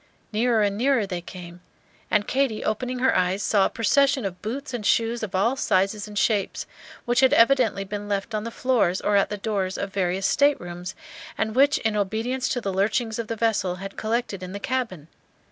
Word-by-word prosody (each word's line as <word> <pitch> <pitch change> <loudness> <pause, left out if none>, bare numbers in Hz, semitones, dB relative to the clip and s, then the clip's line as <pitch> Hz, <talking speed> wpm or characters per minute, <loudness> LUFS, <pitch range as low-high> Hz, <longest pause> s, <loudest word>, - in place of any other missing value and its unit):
Nearer 225 0 +2
and 200 -1 0
nearer 260 -3 +2
they 180 -3 -4
came; 175 0 -10 0.5
and 210 -1 +1
Katy 265 -5 0
opening 250 +4 -2
her 260 +1 +2
eyes 185 +2 +1
saw 200 -3 +3
a - - -8
procession 275 +2 +2
of 180 -2 -5
boots 265 +6 -5
and 240 -3 -3
shoes 230 +3 +1
of 205 -4 -4
all 225 +7 +2
sizes 200 -3 0
and 210 -1 -8
shapes, 205 -2 0 0.4
which 240 0 +2
had 265 -1 +5
evidently 230 -5 +4
been 205 +1 -6
left 200 +2 -2
on 210 -1 -1
the 230 - -4
floors 230 -7 +1
or 205 - +1
at 200 - +3
the 210 - -4
doors 195 -3 -2
of 200 0 -4
various 190 0 0
staterooms, 180 -11 0 0.4
and 220 0 -1
which 275 +4 +4
in 220 -1 -1
obedience 220 +6 -1
to 245 - 0
the 195 -3 -3
lurchings 220 +4 0
of 230 - -3
the 230 - -3
vessel 210 -5 0
had 195 +2 -8
collected 220 -3 -2
in 185 0 -7
the 200 - -5
cabin. 220 - -3
215 Hz, 200 wpm, -24 LUFS, 195-240 Hz, 0.5 s, had